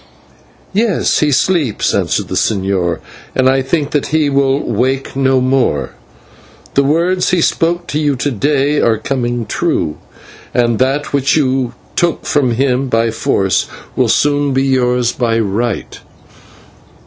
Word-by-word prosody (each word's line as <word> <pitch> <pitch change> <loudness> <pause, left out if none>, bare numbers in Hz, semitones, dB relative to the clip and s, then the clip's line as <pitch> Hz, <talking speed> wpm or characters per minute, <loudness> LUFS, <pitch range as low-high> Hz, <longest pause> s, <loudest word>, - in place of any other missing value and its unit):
"Yes, 210 -1 +1
he 150 -1 +2
sleeps," 140 - +1
answered - - 0
the - - -6
señor, 95 -4 0 0.3
"and 130 0 +3
I 135 0 +3
think 145 +2 -1
that 145 - 0
he 155 -2 +1
will 135 0 +2
wake 130 +5 -1
no 135 -1 +2
more. 125 - 0 0.8
The 140 - +4
words 170 +6 +1
he 180 - +2
spoke 170 +1 +1
to 150 - -1
you 145 -2 +1
to 140 +3 -2
day 145 +4 +1
are 115 -2 +2
coming 120 0 -2
true, 75 -5 -1 0.6
and 120 -2 +2
that 135 +4 0
which 140 +1 +2
you 130 -4 0 0.2
took 170 -1 0
from 130 -5 +1
him 130 +1 0
by 115 -1 +1
force 95 -3 0 0.3
will - - +1
soon 145 -1 +2
be 135 - +2
yours 125 -2 +1
by 115 -2 0
right." 110 +1 -2
135 Hz, 145 wpm, -15 LUFS, 120-145 Hz, 0.8 s, The